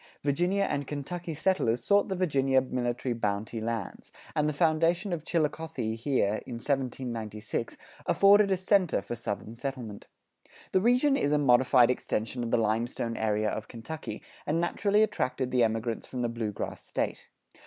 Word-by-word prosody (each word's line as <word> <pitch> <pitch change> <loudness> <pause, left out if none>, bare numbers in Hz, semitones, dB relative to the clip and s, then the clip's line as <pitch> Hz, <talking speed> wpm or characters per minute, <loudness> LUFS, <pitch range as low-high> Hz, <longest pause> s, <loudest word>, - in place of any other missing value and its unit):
Virginia 175 +8 +1
and 140 -7 -2
Kentucky 165 +3 -5
settlers 140 -9 +1
sought 200 +5 +3
the 190 - -1
Virginia 135 -7 +2
Military 125 -1 -2
Bounty 110 0 -2
Lands, 115 -3 -4 0.2
and 150 0 +2
the - - -2
foundation 165 +5 +2
of 160 -3 -3
Chillicothe 155 -8 -1
here, 115 -5 +1
in 125 - -5
1796, 115 -5 -3 0.3
afforded 200 +1 +6
a 190 - +2
center 185 - +2
for 120 - -4
Southern 110 -1 -5
settlement. 120 -4 -6 0.6
The 185 - +3
region 250 +6 +4
is 195 - +1
a 150 - +4
modified 125 -2 +5
extension 120 0 -2
of 115 - -3
the 120 - +3
limestone 115 +1 -1
area 105 -1 0
of 110 - -5
Kentucky, 130 +7 -7 0.2
and 155 +3 +1
naturally 200 +5 +2
attracted 130 -10 -1
the 125 -2 +3
emigrants 115 0 -1
from 125 -1 -4
the 120 - 0
Blue 115 -2 -3
Grass - - -6
State. - - -3
130 Hz, 155 wpm, -29 LUFS, 115-165 Hz, 0.6 s, afforded